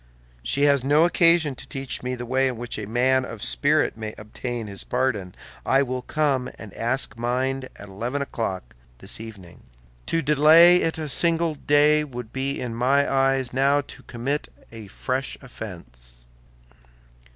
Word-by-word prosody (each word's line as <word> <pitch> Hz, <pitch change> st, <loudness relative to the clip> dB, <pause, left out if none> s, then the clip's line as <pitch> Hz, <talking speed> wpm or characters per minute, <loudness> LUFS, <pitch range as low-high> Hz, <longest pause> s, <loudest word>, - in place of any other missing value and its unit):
She 140 Hz, -, 0 dB
has 140 Hz, -3 st, +4 dB
no 145 Hz, +4 st, +4 dB
occasion 170 Hz, -3 st, +4 dB
to -, -, -11 dB
teach 135 Hz, -2 st, -4 dB
me 125 Hz, 0 st, -3 dB
the 120 Hz, 0 st, -6 dB
way 130 Hz, +2 st, +2 dB
in 125 Hz, -3 st, -3 dB
which 120 Hz, -1 st, -5 dB
a 105 Hz, -, -6 dB
man 130 Hz, +3 st, +2 dB
of 115 Hz, -4 st, -6 dB
spirit 150 Hz, +1 st, +1 dB
may 110 Hz, -1 st, -6 dB
obtain 115 Hz, +2 st, -5 dB
his 100 Hz, -2 st, -5 dB
pardon. 125 Hz, -8 st, -2 dB, 0.3 s
I 135 Hz, +1 st, +3 dB
will 130 Hz, -1 st, -3 dB
come 140 Hz, -3 st, 0 dB
and 105 Hz, -3 st, -11 dB
ask 120 Hz, -1 st, -2 dB
mine 130 Hz, +2 st, -1 dB
at 100 Hz, -, -11 dB
eleven 115 Hz, +8 st, -4 dB
o'clock 105 Hz, -, -4 dB, 0.2 s
this -, -, -7 dB
evening. 100 Hz, -6 st, -11 dB, 0.5 s
To 165 Hz, -, 0 dB
delay 155 Hz, +5 st, +7 dB
it 165 Hz, -2 st, 0 dB
a 155 Hz, -1 st, -4 dB
single 165 Hz, +2 st, +2 dB
day 150 Hz, +1 st, +3 dB
would 125 Hz, -5 st, -8 dB
be 135 Hz, +1 st, -2 dB
in 120 Hz, -2 st, -4 dB
my 135 Hz, +4 st, +2 dB
eyes 135 Hz, -2 st, +1 dB
now 140 Hz, +2 st, +3 dB
to 140 Hz, -, -12 dB
commit 135 Hz, +5 st, -4 dB, 0.2 s
a 110 Hz, -3 st, -10 dB
fresh 130 Hz, +7 st, -3 dB
offense. -, -, -11 dB
130 Hz, 160 wpm, -24 LUFS, 115-145 Hz, 0.5 s, delay